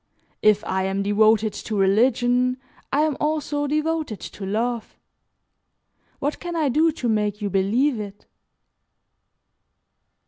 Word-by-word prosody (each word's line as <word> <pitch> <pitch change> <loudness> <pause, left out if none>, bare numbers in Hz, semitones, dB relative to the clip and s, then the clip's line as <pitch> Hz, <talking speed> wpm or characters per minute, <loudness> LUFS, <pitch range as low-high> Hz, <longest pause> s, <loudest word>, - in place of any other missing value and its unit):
If 210 -1 +4
I 190 0 -1
am 195 +1 -1
devoted 215 +1 +3
to 215 - -4
religion, 245 +5 +2 0.3
I 285 - +2
am 305 -2 +1
also 295 -1 -1
devoted 305 -5 -1
to 195 - -7
love. 230 +3 -2 1.2
What 290 +2 -2
can 345 -1 -5
I 310 -4 +1
do 315 +5 +3
to 255 -6 -3
make 210 -2 0
you 205 -2 -3
believe 225 +8 +1
it?" 205 -1 -8
235 Hz, 125 wpm, -23 LUFS, 205-290 Hz, 1.2 s, If